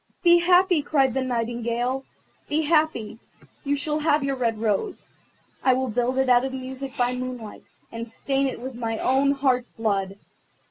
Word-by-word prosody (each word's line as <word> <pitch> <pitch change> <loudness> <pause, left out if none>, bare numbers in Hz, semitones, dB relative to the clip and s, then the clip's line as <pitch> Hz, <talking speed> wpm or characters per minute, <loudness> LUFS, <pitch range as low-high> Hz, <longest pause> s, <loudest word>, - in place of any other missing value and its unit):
"Be 345 -1 +7
happy," 360 -1 +4
cried 270 -3 +2
the 265 - 0
Nightingale, 240 +1 -2 0.5
"be 310 +2 +1
happy; 305 -9 +1 0.4
you 285 0 0
shall 300 +1 -1
have 300 -1 +2
your 275 0 -1
red 230 -4 -1
rose. 220 - -2 0.5
I 260 -1 +4
will 260 0 -1
build 245 +3 0
it 265 0 +2
out 245 0 +5
of 265 0 -3
music 265 +1 -6
by 245 -1 +1
moonlight, 250 -4 -6 0.3
and 230 0 -6
stain 270 +4 -1
it 260 - -5
with 260 +2 -6
my 230 -2 -3
own 270 +4 +2
heart's 260 -3 +1
blood. 200 -3 -2
260 Hz, 170 wpm, -24 LUFS, 235-280 Hz, 0.5 s, Be